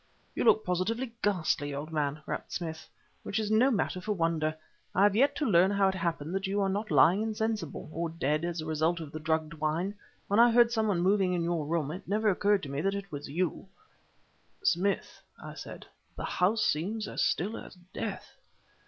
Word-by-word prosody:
"You -, -, -1 dB
look 215 Hz, -, +5 dB
positively 225 Hz, +8 st, -1 dB
ghastly, 160 Hz, -7 st, 0 dB
old 150 Hz, +3 st, -5 dB
man," 150 Hz, -1 st, -1 dB
rapped -, -, -5 dB
Smith, 160 Hz, -2 st, -5 dB, 0.3 s
"which 200 Hz, -, -3 dB
is 215 Hz, -1 st, -1 dB
no 230 Hz, +5 st, +5 dB
matter 200 Hz, -6 st, -1 dB
for 210 Hz, +3 st, -1 dB
wonder. 165 Hz, -3 st, 0 dB, 0.4 s
I 190 Hz, -, +4 dB
have 205 Hz, -1 st, +4 dB
yet 280 Hz, +5 st, +3 dB
to 300 Hz, -, -1 dB
learn 185 Hz, -4 st, +5 dB
how 200 Hz, -1 st, +3 dB
it -, -, -1 dB
happened 170 Hz, -3 st, -2 dB
that 195 Hz, 0 st, -1 dB
you 200 Hz, +1 st, 0 dB
are 195 Hz, -1 st, +2 dB
not 205 Hz, +3 st, -2 dB
lying 155 Hz, +7 st, +5 dB
insensible, 220 Hz, -6 st, -2 dB
or 170 Hz, 0 st, -2 dB
dead, 155 Hz, -1 st, -1 dB
as 170 Hz, -1 st, -2 dB
a -, -, -6 dB
result 160 Hz, +2 st, 0 dB
of 155 Hz, -3 st, -7 dB
the 155 Hz, -, -6 dB
drugged 160 Hz, 0 st, -1 dB
wine. 160 Hz, +5 st, -1 dB, 0.3 s
When 205 Hz, +2 st, +2 dB
I 240 Hz, +1 st, +8 dB
heard 235 Hz, 0 st, +5 dB
some 220 Hz, -2 st, +1 dB
one 185 Hz, -5 st, +1 dB
moving 190 Hz, 0 st, +3 dB
in 175 Hz, -1 st, 0 dB
your 165 Hz, -3 st, -1 dB
room, 155 Hz, -3 st, -1 dB
it 180 Hz, -, -8 dB
never 210 Hz, +2 st, +2 dB
occurred 200 Hz, +1 st, +2 dB
to 145 Hz, -, -5 dB
me 140 Hz, +1 st, -2 dB
that 195 Hz, +3 st, 0 dB
it 195 Hz, -1 st, -6 dB
was 145 Hz, -1 st, -6 dB
you." 175 Hz, +5 st, -2 dB, 1.0 s
"Smith," 190 Hz, +3 st, 0 dB, 0.2 s
I -, -, -8 dB
said -, -, -9 dB, 0.3 s
"the -, -, -4 dB
house 210 Hz, +5 st, +1 dB
seems 205 Hz, +8 st, -1 dB
as -, -, -3 dB
still 205 Hz, +7 st, 0 dB
as -, -, -9 dB, 0.2 s
death." 210 Hz, -4 st, -5 dB
180 Hz, 205 wpm, -30 LUFS, 160-205 Hz, 1.0 s, I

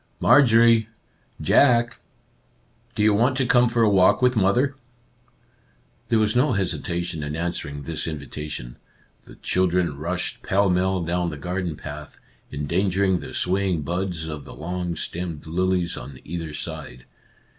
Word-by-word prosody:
" -, -, -41 dB
Marjorie! 115 Hz, -4 st, +6 dB, 0.5 s
Jack! 120 Hz, -3 st, +3 dB, 1.0 s
Do 105 Hz, -, +1 dB
you 105 Hz, 0 st, +5 dB
want 125 Hz, +5 st, +2 dB
to 135 Hz, -, +1 dB
come 125 Hz, -2 st, +4 dB
for 120 Hz, 0 st, +2 dB
a -, -, +5 dB
walk 95 Hz, -2 st, +5 dB
with 125 Hz, 0 st, +3 dB
mother? 120 Hz, +7 st, +2 dB, 0.6 s
" 120 Hz, -, -38 dB
There 115 Hz, -, +2 dB
was 110 Hz, 0 st, +1 dB
no 130 Hz, +5 st, +3 dB
hesitation 85 Hz, -3 st, -2 dB
in 75 Hz, 0 st, -4 dB
answering 75 Hz, -4 st, -4 dB
this 80 Hz, +3 st, -3 dB
invitation. 75 Hz, -5 st, -6 dB, 0.5 s
The -, -, -14 dB
children 90 Hz, -5 st, 0 dB
rushed 85 Hz, +4 st, -3 dB
pell 100 Hz, 0 st, +2 dB
mell 95 Hz, 0 st, +1 dB
down 85 Hz, +1 st, -1 dB
the 75 Hz, -, -6 dB
garden 90 Hz, +2 st, -3 dB
path, 75 Hz, 0 st, -9 dB, 0.3 s
endangering 95 Hz, +5 st, 0 dB
the -, -, -8 dB
sway 95 Hz, +2 st, 0 dB
ing 85 Hz, -4 st, 0 dB
buds 85 Hz, 0 st, -3 dB
of 75 Hz, -3 st, -6 dB
the -, -, -11 dB
long 90 Hz, +2 st, -4 dB
stemmed 85 Hz, -3 st, -5 dB
lilies 90 Hz, +1 st, 0 dB
on 65 Hz, +1 st, -9 dB
either 80 Hz, -1 st, -5 dB
side. 75 Hz, -5 st, -7 dB
90 Hz, 150 wpm, -23 LUFS, 80-105 Hz, 1.0 s, Marjorie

